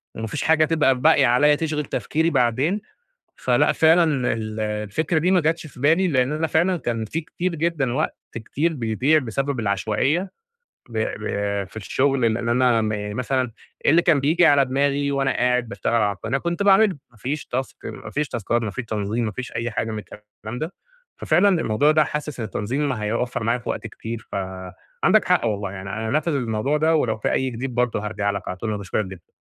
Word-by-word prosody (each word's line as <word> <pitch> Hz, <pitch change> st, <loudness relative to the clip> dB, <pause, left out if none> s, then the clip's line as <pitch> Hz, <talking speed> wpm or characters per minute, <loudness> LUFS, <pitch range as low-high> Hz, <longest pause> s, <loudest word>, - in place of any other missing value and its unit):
وما 110 Hz, -, -4 dB
فيش 140 Hz, -, -3 dB
حاجة 160 Hz, 0 st, +4 dB
تبقى 155 Hz, -4 st, +3 dB
باقية 160 Hz, -1 st, +5 dB
عليّا 145 Hz, +5 st, +4 dB
تشغِل 150 Hz, -1 st, -2 dB
تفكيري 160 Hz, +2 st, 0 dB
بعدين 140 Hz, -, +1 dB, 0.5 s
فلأ، -, -, +2 dB
فعلًا 165 Hz, +2 st, +5 dB, 0.3 s
ال 110 Hz, -1 st, -5 dB
الفكرة 105 Hz, -, -1 dB
دي 180 Hz, +4 st, +2 dB
ما 185 Hz, -2 st, +4 dB
جاتش 160 Hz, +1 st, 0 dB
في 125 Hz, -, -15 dB
بالي، 165 Hz, +7 st, +3 dB
لإن 130 Hz, -4 st, +1 dB
أنا 155 Hz, +2 st, 0 dB
فعلًا 175 Hz, +4 st, +2 dB
كان 115 Hz, -7 st, -2 dB
في 160 Hz, +9 st, -3 dB
كتير 175 Hz, +2 st, -3 dB
جدًا 155 Hz, -6 st, 0 dB
وقت 155 Hz, +4 st, -1 dB, 0.2 s
كتير 145 Hz, +9 st, -1 dB
بيضيع 130 Hz, +5 st, +2 dB
بسبب 135 Hz, +1 st, -2 dB
العشوائية 110 Hz, -, 0 dB, 0.6 s
ب 115 Hz, -2 st, -5 dB
ب 110 Hz, -1 st, -2 dB, 0.4 s
في -, -, -19 dB
الشُغل، 135 Hz, +6 st, 0 dB
لإن 115 Hz, 0 st, -3 dB
أنا 120 Hz, -1 st, +3 dB
م 110 Hz, -, 0 dB, 0.3 s
مثلًا 125 Hz, -1 st, -1 dB, 0.3 s
اللي 165 Hz, +4 st, +5 dB
كان 165 Hz, -5 st, +3 dB
بييجي 165 Hz, +5 st, +4 dB
على 145 Hz, -1 st, +5 dB
دماغي 140 Hz, +2 st, 0 dB
وأنا 135 Hz, -1 st, +1 dB
قاعد 125 Hz, -1 st, +1 dB
باشتغل 115 Hz, -1 st, -2 dB
على 105 Hz, -3 st, +2 dB
القناة 135 Hz, +6 st, -2 dB
كنت 170 Hz, +5 st, -2 dB
باعمله، 200 Hz, -2 st, +5 dB
ما 115 Hz, -, -23 dB
فيش 135 Hz, +7 st, -4 dB
تاسك 130 Hz, +1 st, -3 dB
ما -, -, -8 dB
فيش 150 Hz, 0 st, -1 dB
تاسكات، 120 Hz, +1 st, -1 dB
ما 110 Hz, -, -2 dB
فيش 120 Hz, +5 st, -5 dB
تنظيم، 110 Hz, +1 st, -2 dB
ما 110 Hz, -, -2 dB
فيش 130 Hz, +2 st, -6 dB
أي 120 Hz, +1 st, -2 dB
حاجة 110 Hz, 0 st, -2 dB
من 110 Hz, -, -4 dB
الكلام 105 Hz, +3 st, -10 dB
ده. 160 Hz, +6 st, -4 dB, 0.4 s
ففعلًا 175 Hz, +6 st, +3 dB
الموضوع 115 Hz, +8 st, +2 dB
ده 155 Hz, 0 st, +4 dB
حاسِس 150 Hz, -2 st, -4 dB
إن 110 Hz, -, -2 dB
التنظيم 130 Hz, +9 st, -2 dB
ما 125 Hz, -6 st, -3 dB
هيوفَّر 115 Hz, +3 st, -1 dB
معايا 115 Hz, +2 st, +1 dB
في 120 Hz, -, -9 dB
وقت -, -, -3 dB
كتير، 110 Hz, +1 st, -7 dB
فعندك 95 Hz, -1 st, -1 dB
حق -, -, +2 dB
والله، 100 Hz, -2 st, -2 dB
يعني 95 Hz, 0 st, -7 dB
أنا 110 Hz, +2 st, -3 dB
هانفِّذ 155 Hz, +5 st, 0 dB
الموضوع 125 Hz, +2 st, 0 dB
ده 160 Hz, +2 st, +2 dB
ولو 150 Hz, -, +1 dB
في -, -, -1 dB
أي 130 Hz, 0 st, 0 dB
جديد 125 Hz, +1 st, -5 dB
برضه 120 Hz, -4 st, 0 dB
هارجع 100 Hz, -1 st, -1 dB
لك 100 Hz, -2 st, -5 dB
على 95 Hz, -, -4 dB
طول، 110 Hz, -, -5 dB
أنا 105 Hz, -, -2 dB
باشكُرك 100 Hz, +1 st, -2 dB
جدًا. 95 Hz, -3 st, -12 dB
125 Hz, 200 wpm, -23 LUFS, 110-155 Hz, 0.6 s, باقية